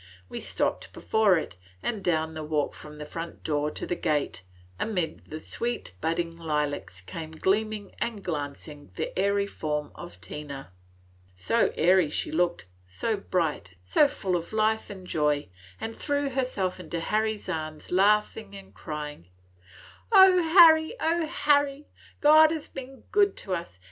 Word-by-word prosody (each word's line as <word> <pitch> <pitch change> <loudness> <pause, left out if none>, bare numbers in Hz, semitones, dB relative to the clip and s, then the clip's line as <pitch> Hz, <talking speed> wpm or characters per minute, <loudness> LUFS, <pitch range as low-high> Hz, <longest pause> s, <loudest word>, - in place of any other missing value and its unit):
We - - -5
stopped - - -2
before 215 -5 +3
it, 90 - -5 0.3
and 215 -5 -2
down 160 -2 0
the 155 -1 -5
walk 150 -1 -1
from 150 0 -11
the 150 - -6
front 165 +2 -7
door 150 -1 0
to - - -5
the 175 - -2
gate, 150 - -1 0.4
amid 180 -7 -2
the 155 - -7
sweet 235 - -4
budding 165 +1 -1
lilacs 150 - -2
came 155 - -7
gleaming 205 +5 -1
and 230 -4 -2
glancing 145 -2 -5
the - - -4
airy 200 +1 +2
form 150 -6 -3
of 90 - -10
Tina. 135 +5 -8 0.6
So 160 - +1
airy 180 -2 +4
she - - -2
looked, 175 - 0 0.2
so 95 - -1
bright, 165 - -2
so 95 - +4
full 190 -9 -2
of 170 +4 -4
life 220 0 +1
and 190 -2 -9
joy, 150 - 0 0.3
and 225 0 -5
threw 285 -1 -1
herself 250 -9 -1
into 170 -1 -4
Harry's 215 +4 -1
arms, 155 -3 -5
laughing 210 +2 +2
and 195 -1 -12
crying. 150 - -7 0.8
"O 380 -3 +8
Harry, 320 +2 +7
Harry! 295 -4 +1 0.4
God 310 +1 +8
has 315 -2 -3
been 265 0 -9
good 405 -1 +3
to 190 - -3
us! 170 - -5
180 Hz, 150 wpm, -27 LUFS, 150-225 Hz, 0.8 s, O